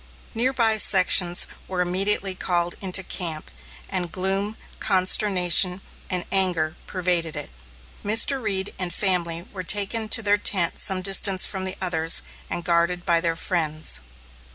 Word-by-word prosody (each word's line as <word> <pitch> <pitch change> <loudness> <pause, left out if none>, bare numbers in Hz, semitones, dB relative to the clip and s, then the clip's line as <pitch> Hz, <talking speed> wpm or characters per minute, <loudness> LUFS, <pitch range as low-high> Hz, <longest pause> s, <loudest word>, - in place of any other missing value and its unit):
Near 240 +3 0
by 225 -4 +2
sections 180 -3 +4 0.2
were 185 -1 -5
immediately 190 +2 -1
called 175 -2 -2
into 190 -1 0
camp, 165 -4 -3 0.4
and 175 -2 -3
gloom, 195 +4 -2 0.2
consternation, 185 -2 +3 0.3
and 180 -2 -3
anger 175 -5 0
pervaded 175 -3 -2
it. - - -7 0.5
Mr. 225 +6 +3
Reed 195 -3 -2
and 180 -2 0
family 170 -4 0
were 190 - -6
taken 205 +4 0
to 225 - +1
their 205 0 +1
tent 185 -5 +2
some 185 -1 +2
distance 195 0 +2
from 190 -2 -6
the 190 - -3
others 165 -3 +2 0.3
and 175 - -5
guarded 170 +1 0
by 170 -1 +1
their 165 -1 -2
friends. 155 - -2
185 Hz, 140 wpm, -22 LUFS, 175-195 Hz, 0.5 s, sections